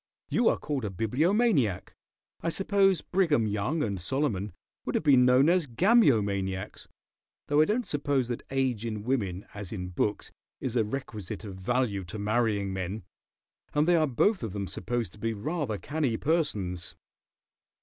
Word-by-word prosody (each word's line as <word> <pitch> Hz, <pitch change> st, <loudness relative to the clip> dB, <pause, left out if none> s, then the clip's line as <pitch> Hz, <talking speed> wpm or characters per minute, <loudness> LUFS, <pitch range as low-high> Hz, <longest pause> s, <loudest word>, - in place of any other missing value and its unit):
You 235 Hz, -, +3 dB
are -, -, +1 dB
called 145 Hz, -4 st, -3 dB
a 105 Hz, -, -1 dB
Bibliomaniac. 130 Hz, -, +1 dB, 0.5 s
I 165 Hz, -, 0 dB
suppose 195 Hz, +1 st, +2 dB
Brigham 160 Hz, -, +2 dB
Young 105 Hz, +10 st, -1 dB
and 100 Hz, -5 st, -2 dB
Solomon 105 Hz, -, -1 dB, 0.3 s
would -, -, -3 dB
have -, -, +1 dB
been 135 Hz, -5 st, +6 dB
known 130 Hz, +3 st, +5 dB
as 175 Hz, -2 st, +3 dB
Gamyomaniacs 110 Hz, -, +2 dB, 0.6 s
though 145 Hz, +1 st, +3 dB
I -, -, +5 dB
don't 225 Hz, +5 st, 0 dB
suppose 140 Hz, -3 st, 0 dB
that 120 Hz, -, -3 dB
age 130 Hz, -5 st, 0 dB
in 110 Hz, -3 st, -4 dB
women 105 Hz, -7 st, -1 dB
as 100 Hz, -3 st, -7 dB
in 90 Hz, -4 st, -4 dB
books 100 Hz, +3 st, -2 dB, 0.3 s
is 125 Hz, -2 st, -3 dB
a 115 Hz, -, +3 dB
requisite 110 Hz, -4 st, -5 dB
of 100 Hz, -3 st, -7 dB
value 100 Hz, +1 st, -1 dB
to 85 Hz, -, -7 dB
marrying 105 Hz, -2 st, 0 dB
men 95 Hz, +2 st, -4 dB, 0.7 s
and 150 Hz, +2 st, +3 dB
they 175 Hz, -, +5 dB
are 155 Hz, -2 st, +3 dB
both 185 Hz, -, +2 dB
of 110 Hz, -5 st, -4 dB
them 100 Hz, -1 st, -3 dB
supposed 115 Hz, 0 st, -3 dB
to 105 Hz, -, -16 dB
be 115 Hz, +1 st, -1 dB
rather 130 Hz, 0 st, -2 dB
canny 145 Hz, -2 st, -1 dB
persons." 105 Hz, -, -1 dB
120 Hz, 160 wpm, -28 LUFS, 100-150 Hz, 0.7 s, been